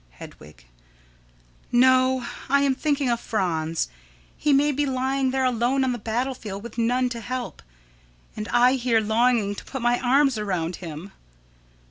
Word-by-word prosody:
Hedwig: 65 0 -14 1.1
No; 255 0 +4 0.2
I 280 +1 +4
am 275 -1 +3
thinking 285 0 -1
of 235 - 0
Franz. 165 -8 -1 0.5
He 300 - 0
may 285 +2 +4
be 290 +1 -1
lying 265 0 0
there 265 0 0
alone 250 +2 +1
on 260 - +1
the 240 - -4
battle 240 +5 -2
field, 200 -4 -8
with 235 0 -7
none 250 +2 +1
to 235 -1 -5
help, 250 +2 -5 0.7
and 215 - -5
I 245 +3 +4
here 240 -2 +2
longing 220 -1 +1
to - - -9
put 265 -3 -6
my 240 0 +2
arms 265 -1 +2
around 180 -4 -2
him. 170 +2 -8
245 Hz, 155 wpm, -24 LUFS, 215-260 Hz, 1.1 s, No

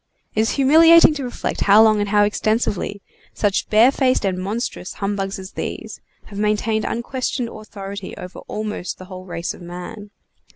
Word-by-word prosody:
It - - -2
is 225 - +1
humiliating 320 +4 +7
to 285 -2 -5
reflect 245 - -4
how 205 +2 +7
long 215 -1 +4
and 205 -1 -1
how 205 0 +4
extensively 210 -1 -1 0.3
such 205 -2 0
barefaced 255 +2 +3
and 185 -1 -1
monstrous 200 0 -4
humbugs 195 -1 -3
as 190 0 -9
these - - -6 0.2
have 200 -1 -8
maintained 215 +1 0
unquestioned 245 0 -3
authority 200 -3 -8
over 180 - -9
almost 210 -4 -4
the 185 - -11
whole 185 0 -10
race 170 -2 -4
of - - -14
man. 180 +5 -8
210 Hz, 160 wpm, -21 LUFS, 195-230 Hz, 0.3 s, humiliating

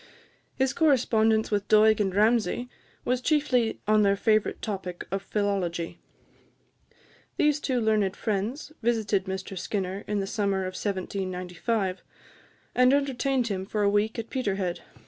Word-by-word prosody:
His 265 0 +1
correspondence 225 -8 +3
with 205 -1 0
Doig 215 0 +5
and 195 -3 0
Ramsay 230 +3 +2 0.4
was 250 0 0
chiefly 255 -6 +1
on 215 0 +4
their 200 -1 +4
favourite 215 +1 +1
topic 185 -4 -5
of 195 0 -1
philology. 190 -5 -2 1.4
These 300 -1 +3
two 260 -4 0
learned 215 -3 +1
friends 220 +8 -3
visited 220 -4 +1
Mr 190 0 -5
Skinner 190 +1 -3
in 210 -1 -1
the 195 - -1
summer 200 -1 -1
of 185 0 -4
1795, 185 +1 -2 0.7
and 250 0 +5
entertained 270 -3 +1
him 190 -2 -2
for 210 +2 -2
a 200 - +4
week 210 +3 +1
at 230 0 -5
Peterhead. 195 -8 -2
210 Hz, 135 wpm, -27 LUFS, 195-235 Hz, 1.4 s, Doig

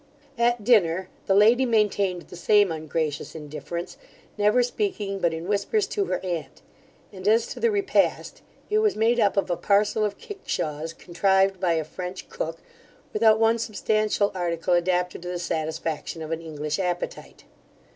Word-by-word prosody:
At 240 -1 +2
dinner, 190 -5 +3 0.2
the 195 - +3
lady 225 +6 +6
maintained 205 -6 +1
the 180 - -12
same 205 +2 +3
ungracious 155 -1 -3
indifference, 160 +3 -6 0.4
never 210 +4 +3
speaking 240 - -2
but 170 -3 +2
in 165 +2 -5
whispers 210 - +1
to 405 -2 0
her - - -1
aunt; 170 -5 -5 0.5
and 190 0 -6
as 225 +2 +4
to - - -10
the 465 - +3
repast, 400 -2 0 0.3
it 425 - +4
was 430 -1 +2
made 230 +2 +2
up 205 -2 +2
of 195 -2 +1
a - - +2
parcel 205 +4 +2
of 210 -1 -1
kickshaws, 165 - -4
contrived 190 +2 +1
by 180 -2 +2
a 160 -1 0
French 180 +4 -7
cook, 165 +1 -5 0.5
without 220 0 +4
one 225 +1 +3
substantial 215 -2 0
article 175 -1 -1
adapted 180 0 +1
to 175 - -8
the 180 0 -3
satisfaction 160 -1 -3
of 155 - -7
an 165 0 -2
English 150 -1 -4
appetite. 180 -2 -4
190 Hz, 160 wpm, -25 LUFS, 170-220 Hz, 0.5 s, lady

